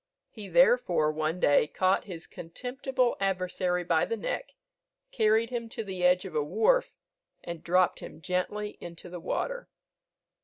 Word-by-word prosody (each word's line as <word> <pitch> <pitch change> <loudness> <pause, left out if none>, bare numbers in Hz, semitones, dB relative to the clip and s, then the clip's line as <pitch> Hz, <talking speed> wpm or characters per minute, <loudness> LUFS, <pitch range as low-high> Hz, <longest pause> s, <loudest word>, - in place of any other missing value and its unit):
He, 210 -3 -9
therefore, 185 - +4
one 155 +3 -2
day 145 -2 +4
caught 185 +4 +1
his 170 -5 -8
contemptible 250 +7 -2
adversary 180 -2 0
by 165 -2 +2
the 230 - -3
neck, 360 - -4 0.6
carried 225 - +2
him 235 -2 -4
to 225 - -5
the 190 -3 -5
edge 180 +1 +4
of 190 - -7
a 150 - +1
wharf, 225 - +2 0.5
and 170 -2 -7
dropped 180 +1 +2
him - - -10
gently 195 +5 -3
into 170 +1 -9
the 180 - -6
water. - - -3
185 Hz, 150 wpm, -29 LUFS, 170-225 Hz, 0.6 s, therefore